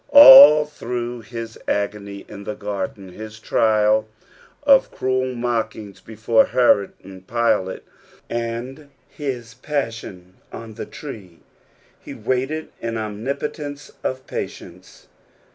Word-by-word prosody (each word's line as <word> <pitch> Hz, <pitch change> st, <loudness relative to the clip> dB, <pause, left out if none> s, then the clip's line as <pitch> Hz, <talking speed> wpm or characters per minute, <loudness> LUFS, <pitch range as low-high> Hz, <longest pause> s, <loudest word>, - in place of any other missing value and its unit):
All 150 Hz, -, +11 dB
through 120 Hz, -5 st, -6 dB
nis 115 Hz, -1 st, -7 dB
agonj 100 Hz, -1 st, -3 dB
ia 100 Hz, -1 st, -10 dB
the 105 Hz, -, -5 dB
garden, 100 Hz, -2 st, -6 dB
hia 110 Hz, +3 st, -8 dB
trial 110 Hz, 0 st, +1 dB, 0.6 s
of 275 Hz, -2 st, +5 dB
cruel 130 Hz, 0 st, -2 dB
mocliings 115 Hz, -4 st, -3 dB
before 110 Hz, +1 st, +2 dB
Herod 120 Hz, -5 st, +2 dB
and 95 Hz, -1 st, -12 dB
i'ilate, 115 Hz, -5 st, 0 dB, 0.5 s
and 120 Hz, +5 st, -5 dB, 0.2 s
his 125 Hz, -5 st, -6 dB
passion 115 Hz, -9 st, -5 dB
on 115 Hz, -1 st, -9 dB
the 105 Hz, -, -7 dB
tree, 100 Hz, -, -10 dB, 0.6 s
he -, -, -10 dB
waited 135 Hz, +5 st, -2 dB
in 115 Hz, 0 st, -3 dB
omnipotence 140 Hz, +7 st, -5 dB
of 130 Hz, 0 st, -3 dB
patience. -, -, -8 dB
115 Hz, 110 wpm, -21 LUFS, 105-130 Hz, 0.6 s, All